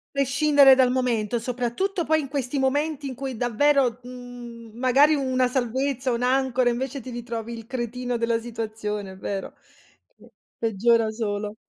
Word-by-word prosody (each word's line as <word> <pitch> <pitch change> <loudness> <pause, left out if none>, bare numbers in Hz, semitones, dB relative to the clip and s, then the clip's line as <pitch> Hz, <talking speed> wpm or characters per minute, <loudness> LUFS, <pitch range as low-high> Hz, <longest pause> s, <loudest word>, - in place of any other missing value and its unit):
Prescindere 275 0 +5
dal 260 -1 +3
momento, 240 -3 0
soprattutto 250 - -2
poi 315 0 +2
in 300 - -3
questi 275 -1 -2
momenti 285 +2 0
in 265 - -4
cui 265 0 -5
davvero, 250 +1 +2
mhmm, 245 -2 -10
magari 265 +5 +4
una 260 -3 +1
salvezza, 260 +1 -1
un'ancora, 250 +1 +1
invece, 260 +3 -2
ti 255 - -9
ritrovi 235 -1 -5
il 225 - -9
cretino 245 0 -3
della 230 0 0
situazione, 215 -3 -5
è - - -12
vero? 195 0 -5 0.6
Che - - -19 0.3
peggiora 225 +1 +2
solo. 210 -2 -3
250 Hz, 145 wpm, -24 LUFS, 230-270 Hz, 0.6 s, Prescindere